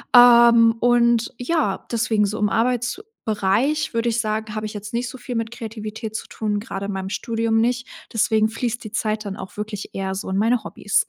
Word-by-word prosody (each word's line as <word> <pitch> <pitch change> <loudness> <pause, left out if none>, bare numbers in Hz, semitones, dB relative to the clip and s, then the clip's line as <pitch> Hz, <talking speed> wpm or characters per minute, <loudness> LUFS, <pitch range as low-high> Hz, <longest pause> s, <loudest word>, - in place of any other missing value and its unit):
ähm, 235 -1 +8
und, 235 -1 +3
ja, 250 - -1
deswegen 225 -2 +2
so 210 +2 -3
im 210 -1 +2
Arbeitsbereich 245 - 0
würde 230 +1 +1
ich 230 - 0
sagen, 215 -1 -2
habe 215 0 -3
ich 215 - -5
jetzt 210 +1 -7
nicht 245 +1 -1
so 260 - -9
viel 245 -1 -6
mit 230 0 -2
Kreativität 220 -1 -6
zu - - -4
tun, 210 -2 -2
grade 200 -2 -5
in 205 - -3
meinem 190 0 -4
Studium 225 0 -1
nicht. 245 +2 0 0.2
Deswegen 220 -1 +2
fließt 235 +1 -3
die 215 - -8
Zeit 215 -1 -1
dann 195 -1 -5
auch 190 +2 -9
wirklich 210 -1 -5
eher 190 0 -3
so 195 - -5
in 190 - -1
meine 225 +3 +2
Hobbys. 200 -1 0
225 Hz, 200 wpm, -22 LUFS, 210-240 Hz, 0.2 s, ähm